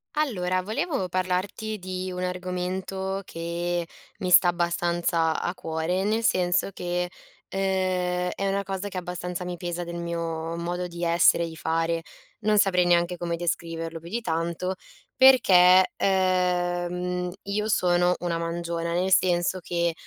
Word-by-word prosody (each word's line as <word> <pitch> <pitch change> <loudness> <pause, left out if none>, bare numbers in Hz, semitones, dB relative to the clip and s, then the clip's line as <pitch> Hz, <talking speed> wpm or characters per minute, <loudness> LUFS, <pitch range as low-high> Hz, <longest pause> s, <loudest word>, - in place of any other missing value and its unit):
Allora, 185 -11 0
volevo 215 - -2
parlarti 185 +4 -2
di 185 0 -5
un 180 0 -4
argomento 185 +1 -3
che 170 +1 -3 0.3
mi 185 - -2
sta 180 - +8
abbastanza 170 -1 +1
a 175 - -2
cuore, 165 +2 -2
nel 220 +3 0
senso 180 -2 +2
che, 180 -1 -2 0.4
ehm, 185 -2 0
è 195 - -2
una 200 +1 0
cosa 195 0 -4
che 195 - -6
abbastanza 180 0 -4
mi 180 0 -4
pesa 175 0 -4
del 170 0 -6
mio 165 -1 -3
modo 175 +1 -3
di 170 0 -7
essere 170 0 +4
e - - -2
i 160 - -10
fare. 165 -1 -1 0.4
Non 215 -1 +2
saprei 190 -3 +4
neanche 175 0 +2
come 170 0 -2
descriverlo 165 -1 -3
più 165 +1 -11
di 235 +5 -2
tanto, 170 0 -2 0.4
perché, 185 -8 +7
ehm, 180 -1 0
io 210 +2 -2
sono 180 -3 +3
una 170 -1 -1
mangiona, 170 0 -3
nel 185 +2 +2
senso 180 0 +2
che, 170 -1 -1
180 Hz, 145 wpm, -26 LUFS, 170-185 Hz, 0.4 s, sta